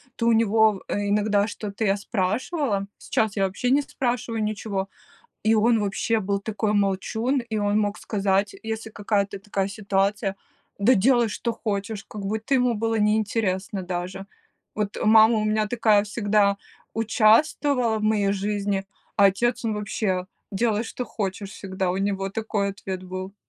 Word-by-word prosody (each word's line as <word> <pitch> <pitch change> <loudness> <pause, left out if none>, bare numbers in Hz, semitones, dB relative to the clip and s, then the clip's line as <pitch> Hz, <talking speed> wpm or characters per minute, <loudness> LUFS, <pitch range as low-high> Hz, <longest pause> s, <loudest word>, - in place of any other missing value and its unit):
то 230 - -2
у 235 - +5
него, 220 -2 +3
э, 205 0 -1
иногда 205 0 +2
что-то 210 +1 -4
я 195 - +3
спрашивала, 205 - -1
сейчас 220 -2 -1
я, 195 - +3
вообще, 200 +6 -2
не 285 +2 +4
спрашиваю 240 -4 -2
ничего. 200 -2 -3 0.5
И 220 - +4
он, 225 +1 +4
вообще, 215 +3 0
был 200 0 -1
такой 210 +1 -2
молчун, 205 +6 0
и 230 -3 -4
он 205 0 +1
мог 205 -1 -1
сказать, 200 -1 0
если 220 0 -4
какая-то 200 -2 -1
такая 195 -1 -2
ситуация: 200 0 -1 0.4
"Да 235 +6 +5
делай, 240 +3 +4
что 235 - -2
хочешь!" 210 -1 -3
Как 210 - -7
будто 220 +6 -2
ему 250 -2 +2
было 225 +1 0
неинтересно 210 -3 0
даже. 180 +2 -4 0.5
Вот, 210 -1 -2
мама 220 +1 +6
у 215 - 0
меня 215 0 +1
такая, 215 -2 +3
всегда 205 -1 +2 0.4
участвовала 225 +2 +3
в - - -4
моей 210 -2 +2
жизни, 200 -1 -1 0.3
а 200 - +6
отец, 240 +6 +2
он 220 - 0
вообще. 200 -3 -1 0.3
"Делай, 215 +2 +1
что 250 +2 -5
хочешь"- 195 -2 -4
всегда 190 -2 -3
у 185 - -2
него 195 -1 -1
такой 205 -1 -1
ответ 190 -1 -6
был. 185 +1 -6
210 Hz, 155 wpm, -24 LUFS, 195-225 Hz, 0.5 s, мама